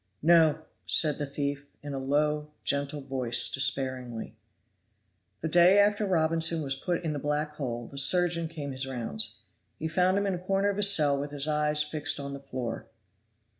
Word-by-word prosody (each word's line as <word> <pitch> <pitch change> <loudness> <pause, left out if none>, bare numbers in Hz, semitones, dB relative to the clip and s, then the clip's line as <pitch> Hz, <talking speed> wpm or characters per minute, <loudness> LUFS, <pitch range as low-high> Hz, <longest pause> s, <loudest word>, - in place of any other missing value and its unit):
"No," 160 -2 +4 0.2
said 150 -3 +3
the 145 - -3
thief, 140 0 -4 0.2
in 145 -1 -6
a 135 - -3
low, 150 +2 0
gentle 140 +1 -1
voice, 130 -3 +2
despairingly. 130 -3 -2 1.1
The 160 - -2
day 175 +4 +5
after 205 0 +3
Robinson 165 -2 +2
was 135 -1 0
put 175 +6 -3
in 160 -2 -2
the 145 - -4
black 150 +2 -2
hole 120 -4 -4
the 140 - -5
surgeon 170 +3 +2
came 150 -3 -7
his 130 0 -5
rounds. 115 - -3 0.4
He 160 - -4
found 180 +4 +1
him 200 - 0
in 195 - 0
a 180 - -4
corner 195 +2 0
of 200 - -6
his 200 -1 +6
cell 145 -6 +4
with 145 +1 -4
his 145 0 0
eyes 150 0 +2
fixed 150 -1 -1
on 140 0 -6
the 140 - -7
floor. 130 -4 -6
150 Hz, 180 wpm, -28 LUFS, 140-165 Hz, 1.1 s, his